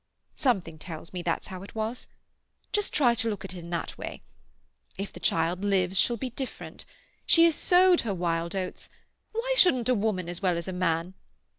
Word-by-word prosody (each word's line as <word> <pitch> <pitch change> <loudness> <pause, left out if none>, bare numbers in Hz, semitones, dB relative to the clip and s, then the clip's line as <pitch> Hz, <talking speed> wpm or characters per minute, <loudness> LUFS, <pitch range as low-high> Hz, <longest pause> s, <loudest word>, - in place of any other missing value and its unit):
Something 185 - 0
tells 165 0 -8
me 180 - -3
that's 170 -1 -1
how 185 -1 -7
it 200 - -12
was. 220 +3 -3 0.7
Just 415 -1 +1
try 250 -5 +4
to 230 -1 0
look 200 -2 -4
at 185 - -6
it 180 - -7
in 170 0 -9
that 170 -1 -4
way. - - -7 0.7
If 195 +1 -5
the - - -9
child 170 +3 +1
lives 190 -2 +2
she'll 235 - +3
be 255 +2 -4
different. 260 +2 -6 0.4
She 330 - +7
has 335 - +4
sowed 360 +3 +5
her 215 -4 -2
wild 170 0 -1
oats—why 445 - -5
shouldn't 255 - +5
a - - +5
woman 200 -5 -1
as 175 +2 -4
well 180 -3 +1
as 170 - -4
a 190 - -3
man? 175 0 0
195 Hz, 190 wpm, -27 LUFS, 175-245 Hz, 0.7 s, She